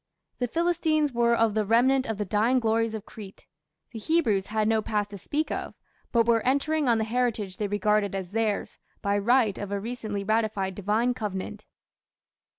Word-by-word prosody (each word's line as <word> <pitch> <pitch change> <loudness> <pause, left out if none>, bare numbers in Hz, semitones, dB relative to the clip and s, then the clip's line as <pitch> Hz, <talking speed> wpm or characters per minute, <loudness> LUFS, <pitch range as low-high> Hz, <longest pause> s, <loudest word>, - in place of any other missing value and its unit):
The 245 - 0
Philistines 315 -1 +1
were 235 0 +3
of 225 -2 +2
the 215 0 +1
remnant 255 +5 +3
of 220 -2 -3
the 210 - -2
dying 220 +6 +2
glories 225 -1 0
of 215 -1 -7
Crete; 200 -3 -12 0.5
the 230 - -7
Hebrews 220 - +1
had 215 0 0
no 220 0 +2
past 210 -1 -2
to 200 - -7
speak 305 - -2
of, - - -4 0.4
but 230 -1 +3
were 230 -1 +3
entering 285 +2 +1
on 230 - +4
the 220 - 0
heritage 225 -4 -1
they 210 - -1
regarded 205 0 +1
as 190 -2 -5
theirs, 220 -1 -1 0.2
by 200 0 +1
right 230 -1 +2
of 205 -1 -5
a 200 - -1
recently 215 -2 -4
ratified 215 -2 0
divine 215 +6 0
covenant." 210 -2 -5
220 Hz, 180 wpm, -26 LUFS, 205-245 Hz, 0.5 s, on